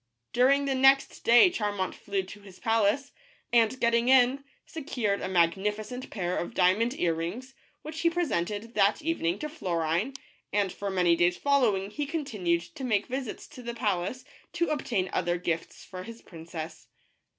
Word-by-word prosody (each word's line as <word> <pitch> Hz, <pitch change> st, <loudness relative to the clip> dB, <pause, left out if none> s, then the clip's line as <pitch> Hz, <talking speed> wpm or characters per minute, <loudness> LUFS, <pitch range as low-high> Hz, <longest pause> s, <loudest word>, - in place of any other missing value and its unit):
During 275 Hz, +3 st, +4 dB
the 275 Hz, -, 0 dB
next 270 Hz, +1 st, +4 dB
day 240 Hz, +10 st, +7 dB
Charmant 205 Hz, -, -2 dB
flew 200 Hz, -1 st, -3 dB
to 205 Hz, +2 st, -11 dB
his 195 Hz, -2 st, -14 dB
palace, 225 Hz, +5 st, +1 dB, 0.4 s
and 235 Hz, +2 st, +3 dB
getting 235 Hz, +1 st, +2 dB
in, 260 Hz, +1 st, +5 dB, 0.2 s
secured 240 Hz, -10 st, -2 dB
a -, -, -2 dB
magnificent 210 Hz, +8 st, 0 dB
pair 180 Hz, -3 st, -2 dB
of 200 Hz, -, -4 dB
diamond 210 Hz, +8 st, +2 dB
ear 170 Hz, -2 st, +2 dB
rings, 195 Hz, +12 st, -5 dB, 0.3 s
which 310 Hz, +1 st, -7 dB
he 335 Hz, -, +3 dB
presented 230 Hz, -, -2 dB
that 205 Hz, +10 st, +2 dB
evening 200 Hz, -, 0 dB
to 305 Hz, -, -4 dB
Florine, 180 Hz, -, -1 dB, 0.4 s
and 200 Hz, -3 st, 0 dB
for 200 Hz, -, -4 dB
many 180 Hz, -3 st, +3 dB
days 175 Hz, +1 st, +2 dB
follow 270 Hz, -8 st, +3 dB
ing 195 Hz, +2 st, -5 dB
he 290 Hz, +5 st, -3 dB
continued 215 Hz, -, -1 dB
to 265 Hz, -, -10 dB
make 215 Hz, -5 st, +1 dB
visits 260 Hz, -2 st, -5 dB
to 250 Hz, -, -11 dB
the 235 Hz, -1 st, -5 dB
palace, 205 Hz, +2 st, -2 dB, 0.3 s
to 340 Hz, -, 0 dB
obtain 225 Hz, -10 st, -1 dB
other 175 Hz, -1 st, 0 dB
gifts 170 Hz, -2 st, -4 dB
for 185 Hz, -2 st, -8 dB
his 230 Hz, +4 st, -10 dB
princess. 160 Hz, -2 st, -8 dB
210 Hz, 165 wpm, -28 LUFS, 180-260 Hz, 0.4 s, day